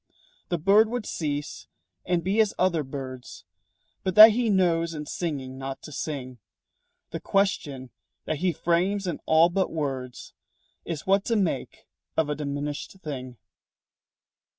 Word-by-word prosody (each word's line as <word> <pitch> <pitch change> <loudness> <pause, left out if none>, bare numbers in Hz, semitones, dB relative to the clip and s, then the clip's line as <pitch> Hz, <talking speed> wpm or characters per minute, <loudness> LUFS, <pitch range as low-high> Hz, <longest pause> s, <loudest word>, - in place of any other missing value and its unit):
The 175 - 0
bird 200 +7 +5
would 240 -2 -3
cease 145 -3 -4 0.4
and 175 -2 +1
be 200 +5 +3
as 215 - 0
other 175 -3 +2
birds 130 -2 -8 0.6
But 185 -1 -2
that 215 +1 +12
he 235 +1 0
knows 170 -4 +2
in 150 0 -5
singing 135 -5 -4
not 135 0 -6
to 155 - -9
sing. 130 -4 -5 0.7
The - - -4
question 145 -10 -1 0.3
that 155 - -2
he 180 +4 +1
frames 180 +5 0
in 175 -4 -3
all 160 +2 +5
but 190 +1 0
words 135 -5 -4 0.5
Is 165 -4 -5
what 195 +1 +3
to 230 - +1
make 195 -6 -2 0.3
of 155 -2 +2
a - - -1
diminished 145 0 -4
thing. 130 -5 -6
160 Hz, 145 wpm, -26 LUFS, 140-190 Hz, 0.7 s, that